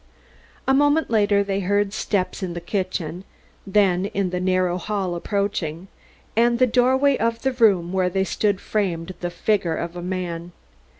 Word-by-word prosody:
A 265 - +4
moment 290 +1 +3
later 205 -2 +3
they 200 0 -2
heard 200 +1 0
steps 200 -3 -1
in 180 -2 -4
the - - -3
kitchen, 180 -2 -3 0.4
then 195 -2 +2
in 195 -2 -2
the 180 - -1
narrow 185 -1 +1
hall 195 -1 -2
approaching, 190 -2 -2 0.5
and 235 +1 +3
the 255 - +5
doorway 260 +3 +3
of 230 0 -1
the 265 - +2
room 195 -8 +3
where 185 -1 +2
they 190 +1 0
stood 200 0 0
framed 185 -5 -2
the 175 - -3
figure 175 -2 0
of 170 +1 -4
a 175 - -5
man. 175 -1 -4
195 Hz, 165 wpm, -23 LUFS, 180-215 Hz, 0.5 s, the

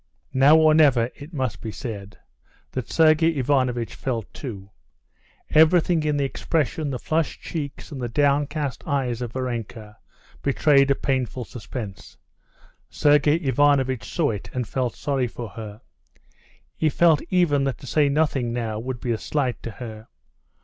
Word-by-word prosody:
Now 140 +4 +6
or 155 -1 +5
never 130 -6 +4
it 145 +3 -12
must 130 -7 -3
be 110 - -5
said—that 100 - -9
Sergey 160 0 +4
Ivanovitch 130 -3 0
felt 120 -5 -4
too. 100 -8 -8 0.8
Everything 160 +1 +4
in 150 -1 0
the 140 - +1
expression, 155 +1 -1
the 130 - -2
flushed 160 +4 -1
cheeks 150 -3 -6
and 135 -3 -6
the 120 - -2
downcast 145 +1 0
eyes 125 -4 -1
of 120 -2 -5
Varenka 115 -4 -5 0.4
betrayed 140 0 +3
a 140 - +4
painful 130 -3 -2
suspense. 105 -3 -8 0.7
Sergey 145 0 +3
Ivanovitch 135 -4 +1
saw 160 -8 +1
it 105 -3 -6
and 125 -3 -2
felt 125 0 -2
sorry 135 -3 -1
for 115 -1 -7
her. 110 0 -9 0.9
He 155 - +1
felt 160 0 +4
even 160 -7 +2
that 135 - -2
to - - -13
say 145 +3 +2
nothing 140 -5 +1
now 115 -3 -3
would 125 +1 -5
be 120 - -2
a 110 - -1
slight 135 -5 -2
to - - -5
her. 110 -1 -9
130 Hz, 150 wpm, -24 LUFS, 120-150 Hz, 0.9 s, Now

